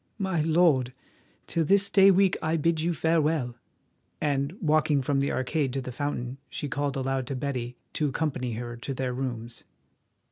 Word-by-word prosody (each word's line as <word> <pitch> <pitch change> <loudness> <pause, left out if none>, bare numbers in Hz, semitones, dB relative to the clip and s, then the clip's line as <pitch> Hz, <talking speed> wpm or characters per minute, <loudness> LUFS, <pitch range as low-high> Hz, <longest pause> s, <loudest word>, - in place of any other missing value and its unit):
My 190 -5 0
lord, 155 -6 +3 0.5
till 165 - 0
this 200 +5 +4
day 195 -1 +6
week 195 0 +4
I 160 +1 +1
bid 160 +1 +1
you 170 +2 +1
farewell," 155 -6 +1 0.6
and, 140 0 0
walking 150 -4 +2
from 140 +1 +1
the 140 - 0
arcade 130 0 -1
to 135 - -1
the 125 - -6
fountain, 130 -1 -3
she 145 - -4
called 145 +1 -2
aloud 135 -1 -1
to 135 - -3
Betty 125 -2 -3 0.2
to 150 -2 0
accompany 130 -4 -2
her 120 +1 -5
to 130 +3 -5
their 130 -1 -2
rooms. 120 -3 -5
140 Hz, 170 wpm, -27 LUFS, 130-160 Hz, 0.6 s, day